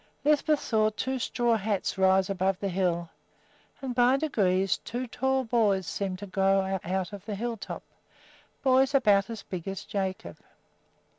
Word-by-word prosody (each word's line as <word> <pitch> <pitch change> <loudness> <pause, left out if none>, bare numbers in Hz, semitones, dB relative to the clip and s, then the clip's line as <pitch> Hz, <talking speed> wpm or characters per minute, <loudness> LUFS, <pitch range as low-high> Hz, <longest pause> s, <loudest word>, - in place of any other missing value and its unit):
Lisbeth 300 0 +3
saw 215 -2 +2
two 260 +5 -3
straw 240 -1 +1
hats 205 -2 -1
rise 190 0 +3
above 190 -1 0
the 200 - -2
hill, 175 -2 -1 0.7
and 260 -2 -2
by 245 +2 +4
degrees 195 -10 +1
two 245 +2 -4
tall 265 +2 0
boys 215 -6 +2
seemed 190 +1 -3
to 205 - -7
grow 195 0 +2
up 190 -1 -3
out 190 +1 -2
of 200 -2 -8
the 210 - -3
hilltop, 230 +1 -5 0.8
boys 265 +1 +4
about 205 -6 +4
as 225 -3 -6
big 180 -2 -6
as 195 0 -4
Jacob. 190 -2 -4
200 Hz, 155 wpm, -28 LUFS, 190-245 Hz, 0.8 s, by